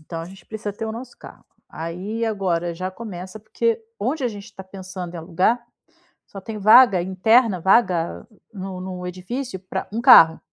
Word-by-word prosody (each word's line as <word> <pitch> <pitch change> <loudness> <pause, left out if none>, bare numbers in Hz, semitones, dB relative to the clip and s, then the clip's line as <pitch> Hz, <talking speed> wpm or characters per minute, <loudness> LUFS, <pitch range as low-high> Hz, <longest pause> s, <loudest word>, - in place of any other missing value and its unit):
Então 165 +1 -7
a - - -6
gente 190 +2 -13
precisa 215 -1 -5
ter 220 +3 -6
o 220 - -4
nosso 240 +2 -9
carro. - - -14 0.2
Aí 185 +8 -5
agora 175 -5 -1
já 185 +2 -4
começa, 190 -1 -8
porque 225 +1 -1 0.2
onde 265 +6 -1
a 245 - +2
gente 205 -2 -9
está 200 -3 -11
pensando 185 -2 -8
em - - -5
alugar 185 +8 +1 0.7
só 195 -1 -10
tem 220 0 -6
vaga 215 -2 +7
interna, 200 +3 +3
vaga 180 -2 +1 0.3
no 190 -2 -7
no 180 -1 -6
edifício 190 +6 -5
para 185 0 -6
um 225 +3 -3
carro. 165 -11 +8
195 Hz, 175 wpm, -22 LUFS, 180-225 Hz, 0.7 s, carro